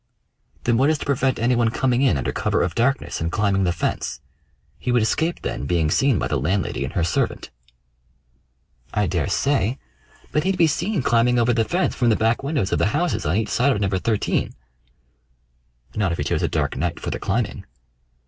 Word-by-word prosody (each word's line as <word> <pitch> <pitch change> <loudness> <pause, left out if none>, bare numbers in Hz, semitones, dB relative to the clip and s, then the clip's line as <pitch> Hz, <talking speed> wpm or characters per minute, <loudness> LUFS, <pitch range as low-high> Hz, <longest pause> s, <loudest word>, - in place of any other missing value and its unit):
"Then 120 -1 +2
what 135 +4 +3
is 155 - +2
to - - -7
prevent 135 -2 +1
any 120 +2 +2
one 120 -1 +2
coming 125 +2 +1
in 135 - +3
under 65 - -2
cover - - 0
of - - -2
darkness 130 - 0
and 80 +1 -1
climbing 100 -1 +1
the 90 - +2
fence? 85 - -3 0.6
He 125 - -2
would 120 -2 +3
escape 160 +9 -1
then 70 - -3
being 80 -2 +1
seen 135 0 +3
by - - -1
the 75 - -1
landlady 90 +8 -1
and - - -5
her 85 - 0
servant." 80 -1 -1 1.4
"I - - +2
daresay; 135 -3 0 0.5
but 150 - +1
he'd 190 +1 0
be 170 - +5
seen 160 - 0
climbing 120 +1 +3
over 120 0 +3
the 115 -1 +1
fence 180 +8 0
from 120 -3 +1
the 110 - +4
back 115 +2 +1
windows 135 -8 -1
of - - +1
the - - +3
houses 175 - -1
on 80 - +1
each 110 -1 -1
side 135 +4 +2
of - - -2
No. 100 - +1
13." 105 +3 -1 1.4
"Not 100 -4 +1
if 85 - -2
he - - -1
chose - - -1
a - - +1
dark - - -1
night 85 +3 -2
for - - -4
the - - -4
climbing." 105 -2 -2
115 Hz, 205 wpm, -22 LUFS, 95-135 Hz, 1.4 s, be